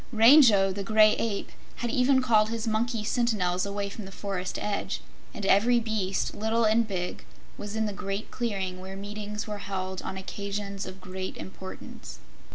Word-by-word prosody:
Rango, 225 -4 +7
the 200 - -4
Gray 215 +1 +5
Ape, 215 -3 -2 0.2
had 240 -1 -3
even 260 +1 +3
called 215 -3 +4
his 230 0 -3
monkey 225 +1 0
sentinels 200 -6 +1
away 200 0 -2
from 200 +1 -7
the 190 - -9
forest 190 -2 -4
edge, 210 -1 -2 0.3
and 205 - -5
every 230 +5 +5
beast, 215 -4 -1
little 220 +2 +1
and 220 +1 +3
big, 180 -3 -4 0.3
was 205 +1 -6
in 220 0 +1
the 210 - -2
great 195 +2 -4
clearing 195 -6 -2
where 190 +1 -7
meetings 210 +2 -5
were 210 -1 -5
held 190 -2 -4
on 190 - -5
occasions 200 +1 -4
of 190 0 -9
great 185 +1 -5
importance. 190 0 -9
205 Hz, 165 wpm, -28 LUFS, 195-220 Hz, 0.3 s, Rango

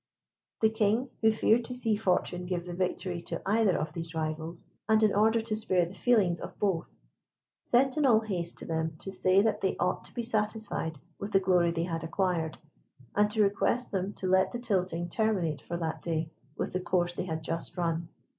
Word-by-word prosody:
The 220 0 +4
King, 220 +3 +1
who 220 -1 +5
feared 225 +2 +3
to 250 - -4
see 230 -4 +1
Fortune 180 -2 0
give 175 -1 -2
the 175 - -6
victory 180 0 -2
to - - -3
either 210 -2 +3
of 155 0 -3
these 165 0 -6
rivals, 160 +1 -3 0.2
and 220 0 +5
in 215 - +4
order 220 +3 +4
to 220 -1 -1
spare 185 -5 +2
the 175 - -9
feelings 195 -6 +2
of - - -8
both, 190 -5 0 0.7
sent 265 +3 +2
in 300 - +3
all 220 -3 +5
haste 180 -6 -3
to - - -8
them 160 -1 -2
to 195 - -7
say 190 +1 +4
that 220 -1 +1
they 190 - 0
ought - - 0
to - - -10
be 240 - -2
satisfied 215 -7 -2 0.2
with 200 +1 -5
the 195 - +6
glory 180 -2 +3
they 165 0 -1
had 165 -2 -3
acquired, 165 -2 -1 0.6
and 210 0 +4
to 215 0 +3
request 205 +5 +1
them 195 0 -1
to 190 - -6
let 190 0 +3
the 240 - -3
tilting 185 -7 0
terminate 180 -6 0
for 170 - -4
that 165 -2 -3
day 160 -1 -2 0.3
with - - -3
the 185 - 0
course 175 -1 0
they 175 - -3
had 160 -2 -4
just 165 +3 -4
run. 165 -1 -1
185 Hz, 205 wpm, -29 LUFS, 170-215 Hz, 0.7 s, the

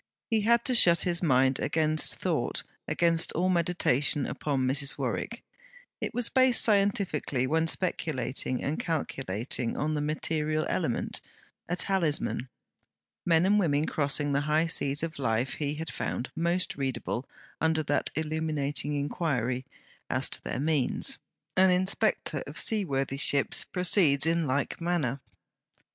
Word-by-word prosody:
He 220 -1 +3
had 235 +2 +3
to 255 - +2
shut 170 -8 +6
his 175 -1 +1
mind 130 -4 +3
against 155 -1 +2
thought, - - -2 0.2
against 170 -1 +2
all 180 +3 +1
meditation 160 -6 +2
upon 135 -3 -2
Mrs. 140 +2 +1
Warwick; - - -3 0.6
it - - -2
was 245 -1 0
based 260 -2 +4
scientifically 195 - +1
when 160 +4 +1
speculating 135 -8 -1
and 145 +3 -2
calculating, 130 - -2
on 155 +1 -1
the 150 - -1
material 155 0 -1
element - - -2 0.5
a 175 - 0
talisman. 165 -9 0 0.8
Men 165 0 +4
and 205 +2 +4
women 150 -5 +1
crossing 145 -1 0
the 140 0 +1
high 155 +2 +3
seas 145 -3 +1
of 165 -3 -4
life 120 0 0
he 145 0 -1
had 160 +1 -5
found 125 - -4
most 170 0 0
readable 135 -1 -3 0.3
under 160 0 +1
that - - 0
illuminating 155 -2 -2
inquiry, 135 -4 -2 0.4
as - - +1
to - - -7
their - - -4
means. 145 -3 +1 0.4
An 190 0 +5
inspector 185 -4 +1
of 145 0 -7
sea 215 +6 +1
worthy 135 -4 -2
ships 140 0 +3
proceeds 175 -6 +2
in 165 -1 +1
like 140 +4 -2
manner. 160 -7 -1
155 Hz, 140 wpm, -28 LUFS, 140-170 Hz, 0.8 s, shut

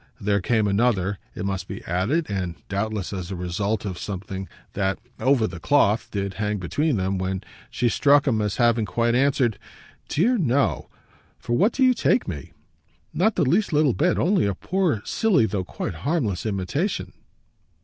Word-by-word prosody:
There 100 0 +1
came 110 +1 +1
another, 100 -2 +1 0.2
it 95 - -4
must 95 -1 -3
be - - -7
added 100 - 0
and 90 -4 -3
doubtless 100 0 -2
as 90 -2 -5
a 95 - -4
result 100 +5 -2
of 95 -3 -4
something 95 -1 -5 0.2
that, 95 -1 0 0.2
over 130 -4 +3
the 90 -4 -5
cloth, 110 - +2
did 100 -1 -3
hang 105 0 0
between 135 - 0
them 95 0 -1
when 95 0 -2 0.3
she 125 - 0
struck 145 +4 +4
him 115 -6 +1
as 105 -2 -1
having 120 -2 +3
quite 115 +3 +1
answered: 130 -4 +2 0.5
"Dear 230 - +2
no 140 -4 +1 0.5
for 120 - -4
what 200 - +3
do 265 - +1
you 255 -1 +6
take 245 +1 +1
me? 75 -6 -6 0.6
Not 210 +5 +2
the 175 - +2
least 185 +10 +2
little 150 -4 +4
bit: 170 +7 +1
only 185 - +2
a 100 - -1
poor 170 - 0
silly, 210 - +2
though 100 -4 -2
quite 90 - -5
harmless, 120 - -1
imitation." 110 - -2
110 Hz, 170 wpm, -24 LUFS, 95-145 Hz, 0.6 s, you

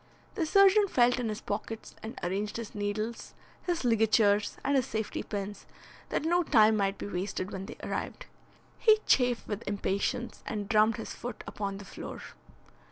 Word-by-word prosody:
The 335 -6 -1
surgeon 395 +3 +6
felt 245 -6 +3
in 235 -3 -1
his 215 - -4
pockets 220 +2 -5
and 220 - -7
arranged 200 +5 -2
his 230 -3 -6
needles, 210 +2 -3 0.3
his 345 -6 -2
ligatures 215 -2 +3
and 280 +1 +2
his 260 -3 +2
safety 220 -1 -3
pins, 205 -1 -5 0.4
that - - -1
no 350 +2 +3
time 220 -9 +5
might 195 -1 0
be - - -6
wasted 190 0 -3
when 190 0 -5
they - - -9
arrived. - - -4 0.5
He 435 -2 +6
chafed 245 -2 +3
with 210 0 -3
impatience 200 +3 -2
and 205 -3 -3
drummed 215 +1 +4
his 225 - -6
foot 245 - -7
upon 200 -1 -4
the 200 - -10
floor. - - -8
220 Hz, 165 wpm, -30 LUFS, 205-245 Hz, 0.5 s, surgeon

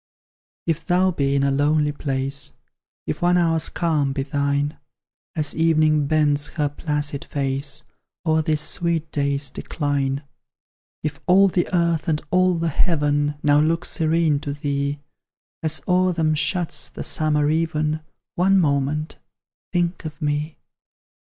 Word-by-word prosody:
If 165 -1 -1
thou 185 +2 +2
be 140 -4 0
in 140 - +2
a 140 - +2
lonely 150 +2 +2
place, 140 -1 -2 0.5
If - - -4
one 175 +1 +3
hour's 165 -2 +2
calm 150 -5 0
be 135 -1 -2
thine, 140 +1 -1 0.6
As 155 -2 0
Evening 155 -2 +3
bends 150 -1 +2
her 150 -2 +1
placid 145 -1 -3
face 140 +1 0 0.4
O'er 160 -1 +3
this 155 -1 0
sweet 165 -2 0
day's 140 -1 0
decline; 140 -2 -2 0.8
If 145 -2 -3
all 195 +2 +6
the 175 -1 0
earth 170 -3 +1
and 155 -2 +1
all 185 0 +3
the 165 0 0
heaven 145 -2 +1
Now 145 0 +5
look 165 +3 +1
serene 160 -2 +1
to 145 -1 -4
thee, 140 -1 -2 0.6
As 160 -1 +1
o'er 185 0 +3
them 160 -2 +1
shuts 175 +2 0
the - - -7
summer 150 -1 +1
even, 155 -1 0 0.3
One 190 +2 +3
moment 150 -1 0 0.5
think 175 -1 -1
of 155 -1 -7
me! 150 0 -2
150 Hz, 135 wpm, -22 LUFS, 145-165 Hz, 0.8 s, all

